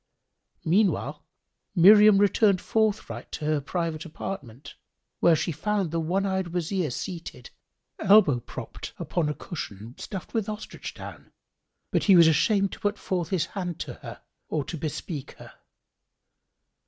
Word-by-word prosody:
Meanwhile, 195 +5 +1 0.5
Miriam 205 +3 +8
returned 200 -1 +4
forthright 210 - -1
to 150 - -4
her 155 -1 +1
private 165 +1 -3
apartment, 150 - -7 0.5
where 170 - +5
she 165 - -1
found 195 +2 -1
the 165 - -1
one 180 +5 0
eyed 190 -2 -1
Wazir 175 0 -1
seated, 165 -3 -7 0.5
elbow 185 - +5
propt - - -8
upon 165 -4 -1
a 150 - -3
cushion 115 - -7
stuffed 190 -3 -7
with 220 -2 -1
ostrich 215 0 -7
down; - - -10 0.6
but - - +1
he 195 - +7
was 170 -1 +8
ashamed 195 +5 +3
to - - -9
put 205 0 -1
forth 175 -5 -2
his 175 -4 +1
hand 180 -4 -5
to - - -5
her - - -11 0.3
or 155 -2 -1
to - - -5
bespeak 155 -1 -5
her. - - -14
175 Hz, 140 wpm, -26 LUFS, 155-200 Hz, 0.6 s, Miriam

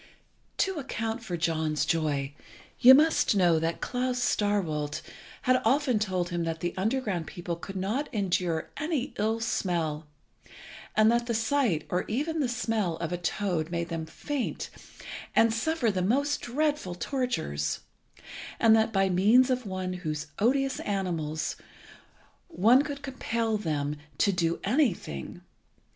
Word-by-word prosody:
To 385 -4 0
account 225 -4 -3
for 180 -6 -3
John's 160 -2 0
joy, 145 -4 0 0.5
you 260 +2 +10
must 310 -6 +3
know 175 -4 +4
that 165 +1 -2
Klas 250 0 -1
Starkwolt 190 -11 0 0.4
had 255 -1 +3
often 255 -1 +2
told 185 -4 -1
him 175 -1 -2
that 165 -1 -3
the 175 - -2
underground 195 - -1
people 175 -2 -4
could 195 +3 -9
not 215 +10 -2
endure 180 -6 -1
any 300 -3 -2
ill 220 +2 +1
smell, 170 -8 -1 0.9
and 215 +1 +6
that 235 0 +1
the 235 - 0
sight, 220 - +1
or 180 - 0
even 300 +8 -1
the 270 -5 +1
smell, 220 -8 -1
of 165 0 -4
a 175 - -1
toad 175 -3 -1
made 170 -1 -2
them 165 -2 -4
faint, 275 - -4 0.6
and 225 0 +5
suffer 245 0 +1
the 185 -2 -1
most 280 +10 +1
dreadful 290 - -1
tortures, 180 - -2 0.8
and 225 -1 +6
that 225 0 +2
by 195 -2 +2
means 215 +8 +4
of 250 -3 -1
one 185 -1 -3
of 180 0 -8
those 155 -1 -3
odious 270 +4 +2
animals 170 -6 -2 0.9
one 230 +9 +5
could 285 -1 -5
compel 230 -4 -1
them 150 -7 -2 0.2
to 200 - +3
do 170 -3 0
anything. 200 - -1
205 Hz, 145 wpm, -28 LUFS, 170-250 Hz, 0.9 s, you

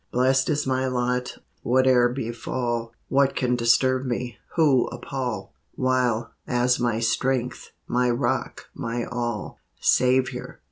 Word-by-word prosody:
Blest 130 +2 +2
is 150 -1 0
my 130 0 0
lot, 125 0 -1 0.2
whate'er 125 0 +4
befall; 120 -1 -3 0.2
What 140 0 +2
can 125 -1 +1
disturb 125 +2 +3
me, 125 -2 -3 0.2
who 145 -7 +4
appall, 120 -6 -5 0.2
While, 125 -3 +1 0.2
as 125 0 +2
my 120 -2 0
Strength, 125 +2 -1 0.2
my 125 0 +1
Rock, 120 +1 -1
my 120 -2 -3
All, 120 -3 -4 0.2
Saviour! 130 - +1
125 Hz, 120 wpm, -24 LUFS, 120-130 Hz, 0.2 s, whate'er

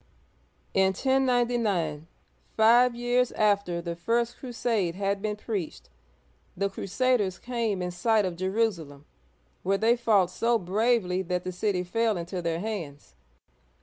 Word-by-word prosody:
In 190 0 +3
1099, 240 - +1 0.5
five 235 +3 +5
years 245 +1 +1
after 200 -5 +1
the 170 -1 -4
first 235 +6 -1
crusade 230 -8 -1
had 200 0 -1
been 210 0 -2
preached, 205 -6 -5 0.7
the 200 +1 0
crusaders 205 -1 0
came 230 -6 -2
in 180 - -3
sight 215 +4 +2
of 180 -2 -3
Jerusalem, 185 -7 -2 0.6
where 195 +1 +1
they 225 +3 +3
fought 210 -7 +2
so 230 +6 +1
bravely 195 -1 +1
that 180 -1 -2
the 185 - -4
city 180 0 -1
fell 220 +3 0
into 175 +2 -4
their 165 -1 -2
hands. 165 - -6
200 Hz, 130 wpm, -27 LUFS, 180-230 Hz, 0.7 s, five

